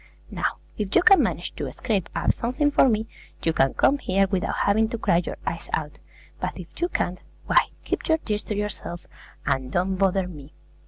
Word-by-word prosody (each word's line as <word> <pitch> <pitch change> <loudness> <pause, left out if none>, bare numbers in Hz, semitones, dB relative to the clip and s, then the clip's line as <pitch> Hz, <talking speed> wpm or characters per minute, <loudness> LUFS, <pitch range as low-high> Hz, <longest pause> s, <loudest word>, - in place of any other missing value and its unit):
Now, - - -1 0.2
if 205 -1 -2
you 360 - +6
can 390 -2 +8
manage - - -2
to - - -3
scrape 205 -7 -1
up - - +2
something 255 +5 0
for 270 - +5
me, 220 -1 +1 0.4
you 165 - +2
can 135 -3 +2
come 285 - +3
here 195 -6 +2
without 195 +1 -1
having 220 +2 +3
to 230 - -3
cry 170 - +2
your 175 - -2
eyes 165 0 -4
out; 150 -2 -2 0.4
but - - -3
if - - -11
you 345 - +2
can't, 180 - -1 0.3
why, - - +4 0.2
keep - - -2
your 320 - +4
tears 210 -9 -2
to 210 - -3
yourself, 200 -4 -4 0.4
and 130 -1 0
don't 185 +3 0
bother 190 -1 +2
me! 150 -4 -11
195 Hz, 200 wpm, -25 LUFS, 175-230 Hz, 0.4 s, can